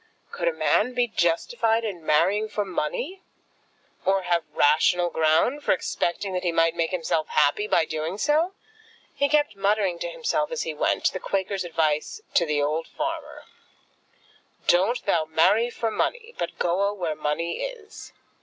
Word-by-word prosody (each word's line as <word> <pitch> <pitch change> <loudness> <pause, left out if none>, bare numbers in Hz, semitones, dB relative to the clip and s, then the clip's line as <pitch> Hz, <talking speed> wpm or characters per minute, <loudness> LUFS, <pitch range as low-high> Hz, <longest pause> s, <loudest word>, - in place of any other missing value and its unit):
Could 470 - -2
a - - +4
man 250 - +1
be 245 -1 +2
justified 225 +4 +1
in 185 -6 -5
marrying 200 +8 +2
for 210 -1 -2
money, 240 - -3 0.8
or 195 0 +2
have 175 -1 +1
rational 170 +4 +3
ground 160 - +2
for - - +3
expecting 185 +2 -2
that 180 - -1
he 175 - 0
might 165 0 +3
make 165 -1 0
himself 165 -3 -1
happy 150 +8 +2
by 160 - +3
doing 160 +4 -4
so? 310 - +1 0.6
He 285 - +1
kept 295 -7 +2
muttering 195 -3 +1
to 170 - -3
himself 300 - -1
as 485 0 -2
he - - -4
went, - - +1
the - - -3
Quaker's 195 0 -2
advice 160 - -1
to 170 - +3
the 150 -1 0
old 155 +3 -1
farmer, 315 -1 -5 1.2
"Doan't 195 +8 +2
thou 170 -6 +2
marry 190 +9 +3
for 230 -1 -2
munny, 470 - -2
but - - -4
goa 200 +4 +1
where 175 -5 -2
munny 155 +3 -2
is!" - - -8
190 Hz, 160 wpm, -25 LUFS, 165-240 Hz, 1.2 s, a